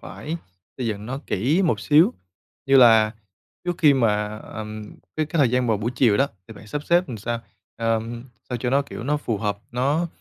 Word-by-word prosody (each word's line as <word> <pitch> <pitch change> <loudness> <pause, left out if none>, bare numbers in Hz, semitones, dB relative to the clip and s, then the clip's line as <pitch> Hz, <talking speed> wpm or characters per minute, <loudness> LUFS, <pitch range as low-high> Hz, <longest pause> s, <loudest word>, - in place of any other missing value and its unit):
phải 160 +3 -6 0.4
xây 125 - -2
dựng 105 -1 -3
nó 130 +2 -4
kỹ 145 - +1
một 170 - +1
xíu, 155 +4 +5 0.5
như 135 - +5
là 110 -4 +6 0.5
trước 175 -1 -1
khi 150 -6 +6
mà, 105 -4 +1
ờm, 110 -1 -8 0.2
cái 155 - 0
cái 165 - -3
thời 135 -5 +4
gian 125 0 +1
vào 110 - +2
buổi 110 +4 -2
chiều 120 -5 +4
đó 140 - +3 0.2
thì 110 - -10
bạn 105 - -13
sắp 145 +7 -4
xếp 175 +1 +3
làm 120 - -5
sao, 115 +2 -3 0.4
ờm, 115 +1 -2 0.2
sao 125 - -3
cho 125 +1 -2
nó 140 +2 +3
kiểu 140 - -8
nó 150 +4 0
phù 115 -7 -2
hợp, 100 -1 -2
nó 140 +8 +1
120 Hz, 210 wpm, -23 LUFS, 110-145 Hz, 0.5 s, là